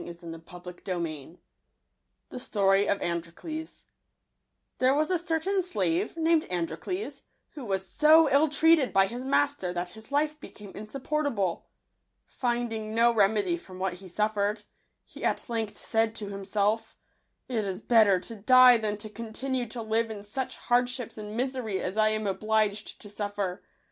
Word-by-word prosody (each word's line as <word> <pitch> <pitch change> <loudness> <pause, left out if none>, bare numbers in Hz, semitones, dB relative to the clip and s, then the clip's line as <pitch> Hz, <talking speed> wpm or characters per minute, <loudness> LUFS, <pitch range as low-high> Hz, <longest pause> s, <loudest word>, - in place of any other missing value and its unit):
Digitized 170 -1 -9
by 180 - -11
Google 180 0 -4
,'wj 155 0 -6 0.9
z - - -9
Utorg 200 -5 +2
of 200 - 0
ftntoQtto* 175 - -5
a - - -37 0.9
HERE 255 +2 +4
was 310 +4 +1
a 360 - +2
certain 345 +3 0
slave, 195 - -1
named 325 -1 +3
Androcles, 180 - -3 0.3
who 290 - -9
was 190 -2 -2
so 315 +6 +6
ill 290 +3 +4
treated 315 -2 +4
by 195 0 +5
his 240 +5 -6
master 275 -7 +1
that 175 0 -3
his 220 +3 -11
life 300 +1 0
became 210 -7 -11
insupportable. 230 - -2 0.6
Finding 235 -3 -2
no 235 +1 +5
remedy 215 - +2
from 185 - -12
what 185 -1 -1
he 190 - -10
suffered, 210 +2 -1 0.4
he - - -12
at - - 0
length 225 -3 -3
said 225 -1 0
to 205 -2 -5
himself, 200 +2 -1 0.5
"It 230 -4 -1
is 190 -2 -3
better 215 -5 +4
to 225 +5 -6
die 250 +3 +7
than 210 -1 -2
to 215 - -7
continue 235 +3 -4
tp 225 0 -7
live 225 +1 +1
in 210 -2 -7
such 255 +6 -4
hardships 245 -2 0
and 210 +1 -6
misery 250 -6 -2
as 185 - -3
I 215 0 +4
am 215 0 -1
obliged 215 +1 0
to - - -10
suffer. 205 -2 -4
220 Hz, 160 wpm, -28 LUFS, 195-255 Hz, 0.9 s, die